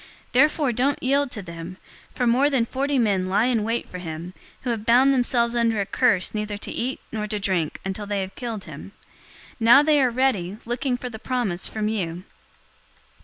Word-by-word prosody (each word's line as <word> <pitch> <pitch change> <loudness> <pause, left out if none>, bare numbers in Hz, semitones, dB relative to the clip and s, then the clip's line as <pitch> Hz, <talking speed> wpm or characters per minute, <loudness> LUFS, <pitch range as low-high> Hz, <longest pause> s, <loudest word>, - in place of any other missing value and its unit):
023:021 - - -34
Therefore 290 +1 +3
don't 260 +4 0
yield 280 +2 +2
to 210 -4 -4
them, 170 +1 -8 0.4
for 250 - 0
more 255 +5 +4
than 260 -5 +1
forty 275 +3 -1
men 195 -6 +1
lie 205 +4 +3
in 240 -4 +1
wait 230 +2 -2
for 180 - -8
him, 170 +1 -7 0.3
who 250 - -1
have 225 -2 -3
bound 255 +4 +5
themselves 240 -2 +2
under 230 -2 +1
a 200 - 0
curse 195 -5 +1
neither 210 -1 -3
to - - -6
eat 255 +3 -3
nor 215 -1 -3
to 210 0 -2
drink 185 -6 -1
until 195 +2 -4
they 205 -1 -1
have 190 0 -5
killed 230 -5 -5
him. 155 +6 -10 0.7
Now 240 +5 +7
they 300 -1 +4
are 255 - +3
ready, 230 -7 0
looking 245 +2 -1
for 250 0 -6
the 220 - -8
promise 235 -8 -2
from 215 -1 -3
you." 180 -5 -3
230 Hz, 200 wpm, -24 LUFS, 195-255 Hz, 0.7 s, Now